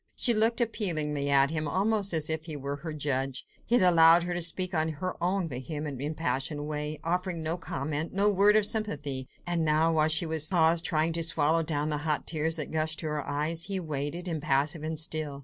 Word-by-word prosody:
She 240 - +4
looked 225 +2 +3
appealingly 155 - 0
at 140 +1 +4
him, 155 -1 -2
almost 200 +5 0
as 160 -3 +1
if 160 0 -1
he 160 -3 -6
were 140 0 -5
her 160 +2 -7
judge. 135 -3 -2 0.2
He 240 - +3
had 205 - +2
allowed 170 -1 +6
her 175 0 -3
to 175 - -3
speak 185 +3 0
on 160 -1 +1
in 160 - -3
her 185 +4 -4
own 185 0 0
vehement, 140 +1 -5
impassioned 150 -1 -2
way, 150 0 -4
offering 175 0 -2
no 160 +2 0
comment, 155 -1 -4
no 200 +2 +2
word 205 +1 +4
of 215 -1 +5
sympathy: 145 - -2 0.2
and 175 -2 -1
now, 160 +1 +2
while 155 -1 +3
she 160 +3 +3 0.2
paused, 165 -2 +3
trying 160 0 +1
to 165 - -2
swallow 160 0 +2
down 155 -2 -2
the 150 - -1
hot 150 0 -1
tears 160 0 -1
that 155 -3 -2
gushed 155 0 0
to - - -6
her 150 -2 -4
eyes, 155 +3 -1
he 195 -2 -2
waited, 155 +2 -4
impassive 150 -1 -1
and 155 0 -2
still. 155 -3 -1
160 Hz, 210 wpm, -28 LUFS, 150-175 Hz, 0.2 s, allowed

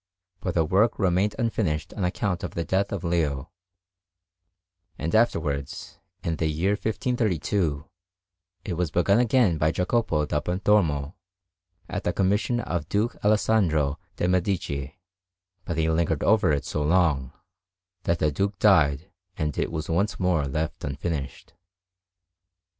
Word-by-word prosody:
But 90 -2 -3
the 80 -2 +3
work 100 +8 +2
remained 95 +1 +1
unfinished 100 -10 -1
on 100 - -3
account 90 0 -1
of - - -5
the 85 - -1
death 95 +3 0
of 100 -3 -3
Leo; 80 -4 -1 1.5
and 80 - -3
afterwards, 80 - 0 0.2
in 80 -1 -1
the 80 - 0
year 80 +6 0
1532, 100 - -1 0.8
it 95 - -3
was 85 -1 -1
begun 100 +6 +3
again 120 -9 +3
by 75 +1 +3
Jacopo 90 -3 0
da 75 0 0
Pontormo 90 -4 +1 0.7
at - - -4
the - - 0
commission 105 +5 +1
of 85 -7 -3
Duke 105 +3 0
Alessandro 90 -9 +2 0.2
de' 90 - 0
Medici, 85 -5 -1 0.7
but 85 - -3
he 80 0 +2
lingered 80 -2 +1
over 105 -5 +4
it 70 -1 0
so 75 - -2
long, 75 -5 +2 0.7
that 85 - +2
the 75 -1 +1
Duke 100 +6 -1
died 90 -5 +3 0.3
and 75 -2 -2
it - - -1
was 80 -2 -4
once 100 +6 0
more 90 -6 +1
left 75 +4 -3
unfinished. 70 0 -4
85 Hz, 135 wpm, -25 LUFS, 75-100 Hz, 1.5 s, over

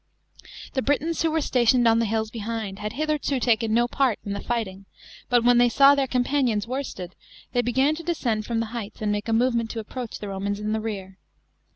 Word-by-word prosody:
The 265 - 0
Britons, 300 +4 0
who 330 - +2
were 320 - 0
s 315 - -2
atioi 245 -1 +4
ed 240 -2 +4
"ii 225 - +2
the 230 - +2
hills 220 0 -1
hehind, 220 -3 -4
had 210 +1 -4
hitherto 300 -1 -1
taken 230 -2 +1
no 240 +2 +3
pan 255 -2 +1
in 200 - -3
the 200 - -3
fighting, 200 -5 -3 0.4
but 245 -1 +3
when 245 0 +5
they 245 0 +5
saw 275 +4 +6
their 275 -1 +1
companions 250 -4 +1
worsted, 230 -8 -5 0.4
they 245 - +3
beg^n 265 +5 +2
to - - -6
descend 235 -11 -1
from 230 -1 0
the - - -1
heights 220 -2 -6
and 210 - +1
made 205 +2 -2
a - - +1
movement 235 0 +2
to 230 - -4
approach 235 +2 -6
the 205 - -7
Romans 200 +1 -3
in 210 0 -3
the 220 0 -1
rear. 195 -4 -6
235 Hz, 225 wpm, -25 LUFS, 215-260 Hz, 0.4 s, saw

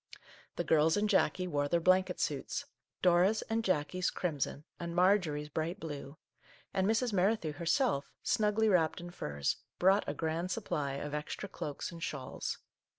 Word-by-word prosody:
The - - -1
girls 160 +2 +4
and 210 +1 +2
Jackie 190 -2 +2
wore 145 -4 0
their 170 +4 +2
blanket 185 +2 +3
suits, - - -2 0.2
— - - -60
Dora's 180 +4 +4
and 225 0 +1
Jackie's 185 -1 +1
crimson 150 -4 -2 0.2
and 170 0 -4
Marjorie's 175 -5 +3
bright 165 +6 -2
blue, 145 -3 -7 0.3
— - - -27
and 190 0 +2
Mrs. 225 +1 +1
Merrithew 185 -4 +2
herself, 170 - +1
snugly 220 -1 +2
wrapped 175 -6 +3
in 175 0 -8
furs, 70 - -2 0.2
brought 195 0 +4
a 145 - -3
grand 165 +3 -2
supply 175 -9 -2
of 145 +1 -5
extra 150 +6 -4
cloaks 145 -6 -5
and 170 -1 -10
shawls. 140 -5 -4
175 Hz, 160 wpm, -33 LUFS, 150-195 Hz, 0.3 s, girls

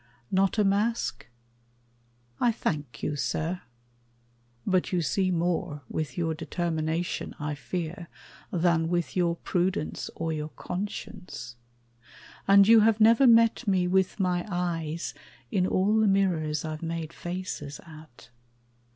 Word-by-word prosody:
Not 195 +2 +2
a 210 - +4
mask? 200 - 0 1.1
I 240 - +4
thank 150 - -3
you, 150 - -1
sir, 160 +5 -2 1.0
But 185 -2 +1
you 175 -2 +1
see 185 +4 +1
more 170 -3 -1
with 155 +2 -3
your 165 -2 0
determination, 165 0 -2
I 150 0 -2
fear, 170 +4 -5 0.4
than 170 -2 +2
with 175 -1 -1
your 175 -2 +2
prudence 180 -2 -1
or 165 0 -2
your 155 0 -4
conscience; 180 - -6 0.9
And 200 0 +7
you 225 0 +8
have 220 0 +4
never 230 +4 +6
met 230 -1 +5
me 185 -2 +2
with 190 +2 +1
my 180 -2 +1
eyes 170 -3 -2 0.4
In 185 -1 +2
all 195 +4 +2
the 220 - +4
mirrors 165 -6 +1
I've 155 -1 -5
made 165 -1 -4
faces 175 -5 -5
at. 155 -8 -14
175 Hz, 125 wpm, -27 LUFS, 160-195 Hz, 1.1 s, you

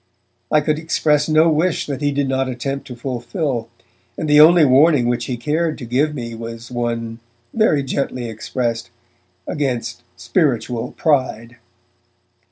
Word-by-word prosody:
I 150 - +4
could 150 +1 0
express 150 -2 +1
no 155 +1 +5
wish 160 +2 +1
that 140 -1 -5
he 145 0 +1
did 140 0 0
not 130 0 0
attempt 135 +2 -4
to 125 - -8
fulfill, 120 0 -3 0.5
and 155 - -3
the 150 0 +7
only 165 0 +7
warning 140 0 +5
which 120 -1 -1
he 125 - -3
cared 155 +6 -1
to 125 - -7
give 140 +6 0
me 115 -3 -5
was 115 +1 -8
one, 115 -1 -3 0.3
very 185 -11 +2
gently 130 -2 -3
expressed, 115 +1 -3 0.6
against 120 -6 -3 0.2
spiritual 120 - -1
pride. 130 -6 0
130 Hz, 145 wpm, -19 LUFS, 120-150 Hz, 0.6 s, the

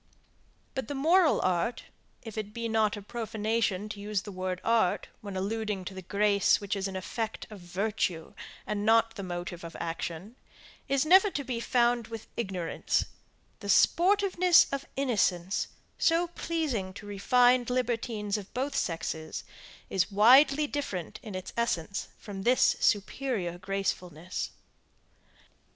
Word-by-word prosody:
But 265 -4 -3
the 285 - -4
moral 325 +4 +4
art, 185 +6 0 0.4
if 225 -3 -8
it 215 -1 -5
be 230 0 -2
not 220 -2 +1
a 205 - -8
profanation 220 -2 -1
to 205 - -7
use 205 -1 -2
the 205 - -8
word 185 -1 -3
art, 225 -5 +2
when 200 -2 -6
alluding 205 -1 -2
to 190 - -6
the 190 - -7
grace 200 +2 +3
which 205 0 -3
is 195 0 -2
an 190 - -6
effect 220 +4 -4
of 210 - -9
virtue, 180 -2 -2 0.3
and 205 -1 -2
not 225 +1 +4
the 200 - -6
motive 175 -1 -5
of 170 0 -8
action, 170 +6 -5 0.5
is 275 +1 +2
never 375 +5 +7
to 285 -6 -3
be 250 -3 -3
found 240 -1 +2
with 225 -2 -7
ignorance; 185 -7 -1 0.5
the - - -7
sportiveness 365 -1 +5
of 275 - -3
innocence, 200 -8 +1 0.3
so 335 +1 +3
pleasing 310 - -2
to 205 - -9
refined 245 +5 +3
libertines 230 -4 -1
of 200 - -11
both 275 +3 -2
sexes, 160 -2 -3 0.4
is 190 +1 0
widely 270 +8 +6
different 275 - -4
in 210 -4 -8
its 185 0 -6
essence 200 -5 -1
from 200 -2 -7
this 245 +5 +4
superior 205 -4 0
gracefulness. 180 -3 -3
210 Hz, 140 wpm, -29 LUFS, 190-245 Hz, 0.5 s, never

